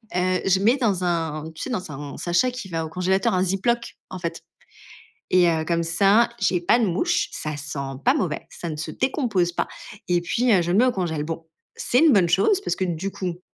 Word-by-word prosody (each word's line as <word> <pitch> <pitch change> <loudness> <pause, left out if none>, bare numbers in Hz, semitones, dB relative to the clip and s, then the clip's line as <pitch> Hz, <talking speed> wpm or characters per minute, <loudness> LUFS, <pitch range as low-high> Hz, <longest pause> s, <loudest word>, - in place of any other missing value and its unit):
heu, 185 0 +1
je 190 0 +3
mets 230 +7 +3
dans 205 -8 0
un 160 -3 -2
tu 160 - -10
sais, - - -4
dans 185 -9 -4
un 140 0 -7
sachet 175 +9 +1
qui 250 -5 -7
va 165 -2 -2
au 160 - -6
congélateur, 185 +3 +1
un 180 - +2
Ziploc, 215 +6 -1 0.2
en 185 - -6
fait 170 -1 -5 0.9
et 180 -1 +6
heu, 160 -1 +1
comme 170 +1 0
ça, 195 +8 +4
j'ai 180 - +1
pas 175 +7 +3
de 235 - +2
mouches. 340 - 0
Ça 150 -1 -4
sent 145 0 -6 0.3
pas 255 - +5
mauvais, 190 - -2
ça 170 - -7
ne 155 - -4
se 155 - -5
décompose 225 - 0
pas - - -1 0.4
et 175 -1 +2
puis, 240 +8 +1
heu, 190 - +5
je 170 - -2
le - - +2
mets 245 - +6
au 255 - +2
congélateur. 165 -7 -2
Bon, 165 +1 -6 0.3
c'est 250 - +1
une 320 -2 +6
bonne 190 -6 +4
chose 195 - +3
parce - - -2
que, 190 - -1
du 180 +2 -3
coup, 180 -2 -5
180 Hz, 230 wpm, -23 LUFS, 165-220 Hz, 0.9 s, et